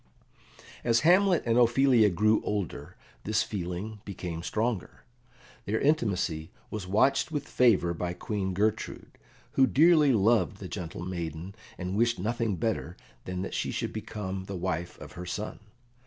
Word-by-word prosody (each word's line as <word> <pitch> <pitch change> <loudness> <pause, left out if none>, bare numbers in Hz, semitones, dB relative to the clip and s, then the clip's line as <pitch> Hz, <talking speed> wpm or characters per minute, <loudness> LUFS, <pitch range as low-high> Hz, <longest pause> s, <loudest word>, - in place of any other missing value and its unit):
As 115 -1 +3
Hamlet 180 +2 +4
and 115 0 +3
Ophelia 120 -2 +5
grew 105 +4 +3
older 100 -5 -4 0.3
this 110 +1 +1
feeling 100 +2 -5
became 90 -4 -5
stronger. 105 -1 -2 0.6
Their 110 +2 0
intimacy 95 - 0 0.2
was 105 -4 -5
watched 135 +10 +2
with 145 -2 -3
favour 100 -9 +3
by 90 +1 -3
Queen 95 0 -3
Gertrude, 110 +2 -2 0.3
who 135 -1 +4
dearly 155 0 +5
loved 110 -1 +3
the 100 - -7
gentle 85 -1 -6
maiden, 85 0 -5 0.2
and 90 +1 -3
wished 115 +2 +2
nothing 115 +1 -1
better 85 - -2 0.3
than 90 0 -3
that - - -5
she - - -1
should - - -3
become 95 -2 -5
the 95 -1 -5
wife 85 0 -3
of - - -10
her 90 - -8
son. 105 +4 -4
105 Hz, 145 wpm, -28 LUFS, 90-120 Hz, 0.6 s, Ophelia